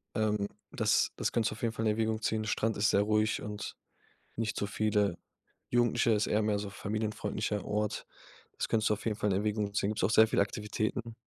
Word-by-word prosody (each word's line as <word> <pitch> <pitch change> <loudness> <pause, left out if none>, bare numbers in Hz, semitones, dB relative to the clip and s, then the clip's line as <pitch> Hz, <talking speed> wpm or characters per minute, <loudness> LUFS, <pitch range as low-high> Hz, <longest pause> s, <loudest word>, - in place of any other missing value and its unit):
ähm, 105 -2 +1 0.3
das - - +2
das - - -1
kannst 115 -2 +1
du - - -3
auf 115 - -13
jeden 115 -2 0
Fall 115 - -2
in 110 - +4
Erwägung 110 0 0
ziehen. 110 0 0
Strand 110 +1 0
ist 105 +1 +3
sehr - - +4
ruhig 110 +1 +1
und 105 -1 -5 0.6
nicht 110 -2 -2
so 100 - -1
viele 105 -3 +1 0.5
Jugendliche, 120 -1 +3
ist 105 0 +2
eher 105 +1 +2
mehr 105 -1 +1
so 100 - -5
familienfreundlicher 105 0 -2
Ort. 105 0 -2 0.5
Das - - -2
könntest 110 -1 +2
du 105 - +4
auf 105 - -10
jeden 110 -2 0
Fall 105 - +1
in - - +2
Erwägung 105 -1 -1
ziehen. 100 0 +1
Gibt's 105 - -1
auch 95 - +3
sehr 110 -1 +6
viele 100 - +3
Aktivitäten. 110 +3 -3
105 Hz, 215 wpm, -31 LUFS, 105-110 Hz, 0.6 s, sehr